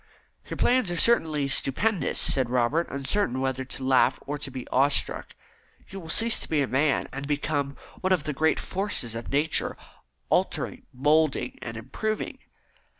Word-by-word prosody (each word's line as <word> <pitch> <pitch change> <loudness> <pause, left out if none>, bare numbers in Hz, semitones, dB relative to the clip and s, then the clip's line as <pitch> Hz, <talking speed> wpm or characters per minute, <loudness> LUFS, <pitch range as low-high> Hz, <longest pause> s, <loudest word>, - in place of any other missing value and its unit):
"Your - - -5
plans 250 -6 +2
are 175 - -2
certainly 160 -11 +3
stupendous," 180 +9 0
said 130 -3 +3
Robert, 125 +7 +1
uncertain 135 0 -1
whether 130 0 -1
to 130 +1 -7
laugh 130 -1 +3
or 145 +1 -4
to 145 - -5
be 130 -1 -7
awe 135 +2 +4
struck. 145 - -1 0.5
"You 195 - -7
will 165 -3 -10
cease 225 +7 +3
to - - -2
be 150 -3 +2
a - - -2
man, 140 +3 +1
and 140 +1 -5
become 145 -1 -1 0.2
one 185 - -1
of 180 -5 +3
the 150 - -3
great 160 +3 +2
forces 190 - -1
of 115 0 -6
Nature, 150 +3 +1 0.5
altering, - - -1
moulding, 150 +3 +1
and 115 -2 -6
improving." 210 - -4
145 Hz, 165 wpm, -26 LUFS, 130-165 Hz, 0.5 s, awe